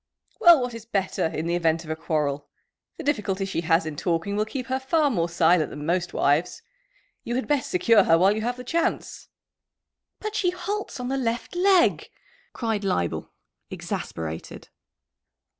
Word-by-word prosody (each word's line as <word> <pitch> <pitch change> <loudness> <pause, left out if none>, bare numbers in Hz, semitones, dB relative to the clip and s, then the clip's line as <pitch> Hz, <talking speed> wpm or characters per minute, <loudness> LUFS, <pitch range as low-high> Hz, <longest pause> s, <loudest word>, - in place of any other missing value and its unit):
"Well, 345 -3 +8
what 245 -1 -3
is 230 -1 -9
better, 195 -6 -1
in 160 0 -4
the 170 - -1
event 165 -1 +1
of 160 - -6
a - - -1
quarrel? 150 -3 -2 0.5
The 330 - -7
difficulty 205 -9 -1
she 195 -3 -2
has 165 0 +2
in 155 -1 -5
talking 170 +5 -1
will 210 +1 +1
keep 250 +3 -5
her 260 0 -1
far 290 +2 +1
more 170 -6 0
silent 170 -1 +3
than 145 0 -7
most 175 +2 0
wives. 145 +5 +1 0.6
You 240 - -3
had 260 - -2
best 290 -3 0
secure 230 - +4
her 165 - +5
while 190 +4 +4
you 220 - -2
have 245 +2 -2
the 250 - -7
chance." 330 +6 -2 0.9
"But 430 0 -5
she 360 - +2
halts 400 -2 -4
on 250 0 -4
the 270 - -1
left 235 +5 -3
leg," 370 -1 +3 0.4
cried 225 -4 -2
Leibel, 90 - -1 0.4
exasperated. 80 0 -6
200 Hz, 175 wpm, -25 LUFS, 165-265 Hz, 0.9 s, Well